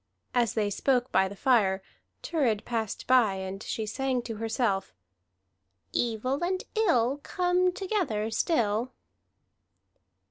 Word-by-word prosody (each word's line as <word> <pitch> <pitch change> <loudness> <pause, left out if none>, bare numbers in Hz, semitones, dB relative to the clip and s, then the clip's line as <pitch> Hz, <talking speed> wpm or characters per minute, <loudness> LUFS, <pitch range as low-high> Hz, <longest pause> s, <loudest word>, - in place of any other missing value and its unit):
As 240 -4 +1
they 210 -2 +1
spoke 250 +3 +1
by 190 0 +3
the 200 - -8
fire, 200 -5 +2 0.4
Thurid 250 -11 0
passed 225 -4 -3
by, 245 -6 +4
and 190 +1 -5
she 220 - -3
sang 255 +2 -1
to 225 -2 -5
herself: 220 - -1 1.0
"Evil 245 +6 0
and 370 +1 -1
ill 290 - +2
Come 360 +3 +1
together 355 - -1
still." 235 - +1
235 Hz, 115 wpm, -28 LUFS, 210-275 Hz, 1.0 s, by